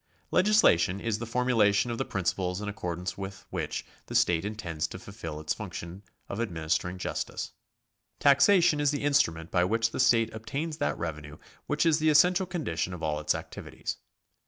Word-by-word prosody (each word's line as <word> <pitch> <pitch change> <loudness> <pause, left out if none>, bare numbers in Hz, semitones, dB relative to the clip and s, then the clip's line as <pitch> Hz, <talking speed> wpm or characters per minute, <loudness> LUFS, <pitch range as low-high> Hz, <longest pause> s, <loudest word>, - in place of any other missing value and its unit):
Legislation 180 - +4
is 110 0 -2
the 115 - -5
formulation 115 -2 +2
of 115 - -4
the - - 0
principles 90 -1 -1
in 105 - -5
accordance 90 -2 -4
with 95 0 -7
which - - -3 0.2
the - - -6
state 85 -1 +3
intends 85 -7 -3
to 95 - -8
fulfil 95 -6 -7
its 75 0 -1
function 85 +3 -7 0.3
of 100 - -5
adminis 85 -8 -1
tering 90 +1 -6
justice. - - -4 0.7
Taxation 150 +3 +5
is 145 -1 +3
the 145 0 -2
instrument 85 - +1
by 90 - +3
which 115 +5 +1
the - - -5
state 115 -3 +3
obtains 145 +8 -4
that - - -1
revenue 75 -2 -5 0.3
which 150 +3 +1
is 160 -1 +4
the 155 0 +3
essential 180 +5 +4
condition 95 - -2
of 85 - -10
all 75 -1 0
its 75 - +1
activities. - - -6
105 Hz, 175 wpm, -28 LUFS, 85-140 Hz, 0.7 s, Taxation